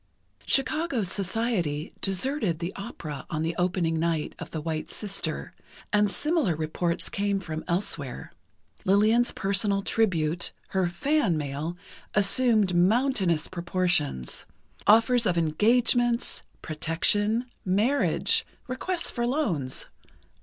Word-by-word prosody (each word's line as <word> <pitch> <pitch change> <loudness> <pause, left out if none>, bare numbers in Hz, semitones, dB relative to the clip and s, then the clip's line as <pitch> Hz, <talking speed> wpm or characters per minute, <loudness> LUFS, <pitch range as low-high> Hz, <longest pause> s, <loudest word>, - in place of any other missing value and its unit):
Chicago 275 -2 +2
society 190 -5 -1
deserted 195 - 0
the 170 +3 -4
opera 160 - -7
on 155 -2 -2
the 165 +1 -2
opening 175 -2 0
night 165 -2 -1
of - - -7
"The 160 - -4
White 155 0 -4
Sister," 200 -2 -4 0.4
and 210 0 +4
similar 295 - +1
reports 170 +2 -2
came 200 -1 -1
from 160 -4 -5
elsewhere. 170 -7 -2 0.5
Lillian's 215 +5 +3
personal 200 0 +1
tribute—her 180 -2 0
"fan" 215 - +1
mail—assumed 185 - 0
mountainous 190 - +2
proportions: 175 - -1 0.4
offers 230 +2 +5
of 175 -2 +1
engagements, 235 +8 +2 0.2
protection, 205 +9 +1 0.2
marriage, 215 +10 +2 0.2
requests 335 +8 -2
for 240 -1 -1
loans 190 - -1
190 Hz, 100 wpm, -27 LUFS, 165-230 Hz, 0.5 s, offers